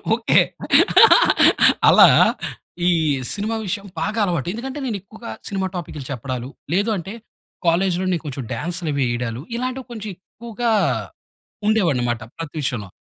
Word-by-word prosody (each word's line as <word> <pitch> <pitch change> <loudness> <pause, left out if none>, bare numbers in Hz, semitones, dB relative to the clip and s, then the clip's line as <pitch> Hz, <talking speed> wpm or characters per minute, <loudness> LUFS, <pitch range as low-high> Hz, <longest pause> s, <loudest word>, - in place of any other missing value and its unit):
Okay. 230 - +3 1.5
అలా, - - +8 0.8
ఈ - - +5 0.4
cinema 215 +2 -2
విషయం 200 +2 -3 0.2
బాగా 210 +6 -2
అలవాటు. 170 -7 -2
ఎందుకంటే, 265 +5 -6
నేనెక్కువగా 220 +1 -6 0.2
సినిమా 190 -1 -2
టాపిక్లు 155 -5 -6
చెప్పడాలు, 130 0 -5 0.2
లేదు 205 +4 +1
అంటే, 190 +4 -7 0.5
కాలేజ్‌లో 180 +2 +1
నే 175 - +1
కొంచెం 135 -3 -5
డాన్స్‌లవీ 160 -4 -2
ఏయడాలు, 120 0 -3
ఇలాంటివి 255 +1 -4
కొంచెం 215 -3 -6
ఎక్కువగా 235 +4 -4 1.0
ఉండేవనమాట, 135 - +1 0.2
ప్రతి 165 -2 -7
విషయంలో. 110 -7 -3
185 Hz, 115 wpm, -21 LUFS, 140-220 Hz, 1.5 s, అలా